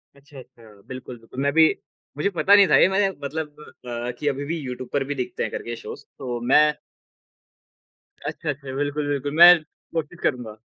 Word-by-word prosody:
अच्छा, 140 0 -15
अच्छा, 110 -5 -17
बिल्कुल, 130 -1 -8
बिल्कुल, 115 +3 -11
मैं 140 - +2
भी 160 -1 +6 0.5
मुझे 175 +7 +1
पता 190 +2 +4
नहीं 200 -2 +7
था, - - +4
ये - - +6
मैंने 195 0 +2 0.2
मतलब 155 +2 -3 0.6
अ, - - -1
कि 145 - -3
अभी 140 0 -1
भी 165 +3 -3
यूट्यूब 130 -2 -7
पर 140 -1 +1
भी 145 +1 -4
दिखते 125 -2 -3
हैं, - - -3
करके 120 0 -5
शोज़। - - -10
तो 125 -3 -4
मैं 150 0 +5 1.5
अच्छा, 155 - -4
अच्छा। 135 -2 -5
बिल्कुल, 145 +1 -2
बिल्कुल, 145 0 -2
मैं 175 +1 +10 0.4
कोशिश 165 +1 -4
करूँगा। 120 -5 -2
145 Hz, 185 wpm, -23 LUFS, 130-155 Hz, 1.5 s, मैं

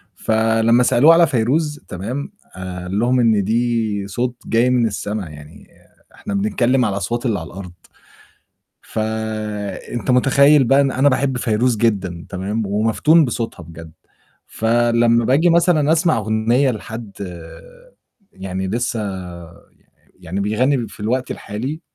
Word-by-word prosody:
فلمّا 115 +2 +2
سألوه 145 +7 +5
على 170 -1 +5
فيروز 145 +5 0
تمام، 125 - -5 0.2
قال 95 +1 -5
لهم 125 +2 +2
إن 110 -4 +3
"دي 110 -2 -1
صوت 120 +5 -3
جاي 115 +2 +2
من 125 -2 +2
السما، 105 -3 -4
يعني 75 0 -13 0.5
إحنا 205 - -6
بنتكلّم 135 - +1
على 100 - -1
الأصوات 120 +6 -3
اللي 110 -6 0
على 80 - -8
الأرض." 90 -1 -9 1.1
فأنت 110 0 -4
متخيّل 140 +3 +5
بقى 135 +3 +4
إن 135 -2 +1
أنا 135 +2 +3
باحب 130 -1 0
فيروز 115 +1 +1
جدًا 95 -6 -1
تمام، 100 +3 -3
ومَفتون 115 +11 +3
بصوتها 115 -7 -4
بجد، 80 0 -12 0.5
فلمّا 115 0 +2
باجي 155 +7 +3
مثلًا 165 -3 +3
أسمع 165 -2 +2
أغنية 110 +5 +1
لحد 110 -1 -7 1.2
يعني 95 0 -5
لسّه 120 +1 -2
يع 90 -4 -7 0.7
يعني 90 +3 -5
بيغنّي 120 +3 0
في 105 - -15
الوقت 125 +4 -2
الحالي، 130 +10 -5
115 Hz, 130 wpm, -19 LUFS, 100-130 Hz, 1.2 s, سألوه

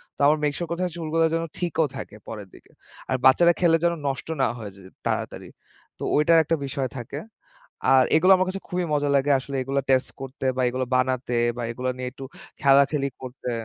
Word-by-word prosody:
তো - - -43
আমার 150 - +4
make 145 -1 +1
sure 175 - -3
করতে 170 +2 -2
হয় 180 - -4
চুলগুলো 165 0 0
যেন, 165 0 0
ঠিকও 165 -3 0
থাকে - - -8
পরের 105 -3 -7
দিকে। - - -19 0.4
আর 130 - +1
বাচ্চারা 170 +6 +6
খেলে 165 -2 +5
যেন, 170 0 +3
নষ্ট 135 +1 -3
না 130 - +4
হয়ে 105 -4 -7
যায় 95 -1 -14 0.2
তাড়াতাড়ি। - - -3 0.5
তো - - -6
ওইটার 150 +3 +5
একটা 165 +2 0
বিষয় 135 -1 -3
থাকে। 120 +4 -6 0.8
আর 130 - +6
এগুলো 185 +4 +6
আমার 185 - +1
কাছে 195 +1 -5
খুবই 180 -1 -1
মজা 145 0 +1
লাগে 140 +1 +1
আসলে। 135 +1 -6
এগুলো 135 +2 -1
টেস্ট 130 -1 +2
করতে 135 0 -7
বা 130 - +1
এগুলো 130 +1 -2
বানাতে 130 -1 0 0.2
বা 120 - -4
এগুলো 125 +2 -3
নিয়ে 125 0 -4
একটু 135 +1 -9 0.4
খেলাখেলি 140 0 +4
করতে। 125 0 -6
140 Hz, 200 wpm, -24 LUFS, 130-165 Hz, 0.8 s, বাচ্চারা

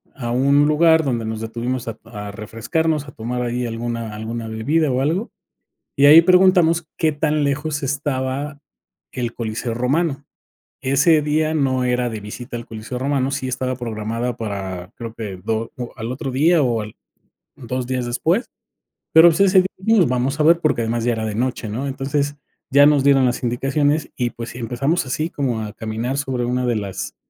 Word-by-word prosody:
a 120 -3 -4
un 140 +4 +4
lugar 160 +1 +4
donde 120 -4 -1
nos 110 0 -4
detuvimos 120 +2 -3
a 115 -1 -5
a 105 -3 -7
refrescarnos, 145 - -2
a - - -9
tomar 125 +1 -4
ahí 120 +1 -2
alguna 115 -1 -4
alguna 115 +1 -5
bebida, 140 +8 0
o, 130 +1 0
algo, 170 - -1 0.7
y 140 - +5
ahí 155 +3 +10
preguntamos 180 -2 +4
qué 160 -2 +2
tan 150 0 0
lejos 145 +1 -1
estaba 140 +1 -2 0.5
el 120 -3 -3
Coliseo 115 0 -3
Romano, 140 +4 0 0.6
ese 150 +4 +4
día 155 +1 +1
no 135 -4 +1
era 125 0 +1
de 110 -1 -5
visita 120 +4 -7
al 120 0 -7
Coliseo 115 +3 -6
Romano, 135 0 0
sí 135 -2 -2
estaba 130 0 -2
programada 115 0 -3
para 95 -4 -5
creo 115 -1 -7
que 105 -5 -6
do 115 +1 -2 0.2
al 115 0 -4
otro 135 +1 -4
día 155 +5 +3
o 120 -4 +1
al 105 0 -9 0.6
2 125 0 -4
días 130 -1 -2
después, 165 - 0 0.6
pero, 160 +2 +9
pues, 165 +2 +1
ese 195 -1 +5 0.2
día 195 -2 +3
vamos 125 +3 0
a - - +4
ver, 165 +2 +5
porque 155 -7 +1
además 115 +1 -1
ya 120 - +2
era 110 -1 -3
de 105 - -3
noche, 125 -1 -2
¿no? 120 +7 -3
Entonces 140 +2 -2 0.3
ya 145 +2 +7
nos 145 -2 +4
dieron 140 -2 +5
las 125 +1 -1
indicaciones, 145 +5 0
y 120 -2 0
pues 115 0 -7
si, - - -9
empezamos 135 +8 -1
así 155 +5 -1
como 125 -8 -2
a 105 -1 -6
caminar 115 +5 -3
sobre 130 -4 -2
una 125 +1 0
de 120 -2 +1
las 100 -3 -4
130 Hz, 180 wpm, -20 LUFS, 115-150 Hz, 0.7 s, ahí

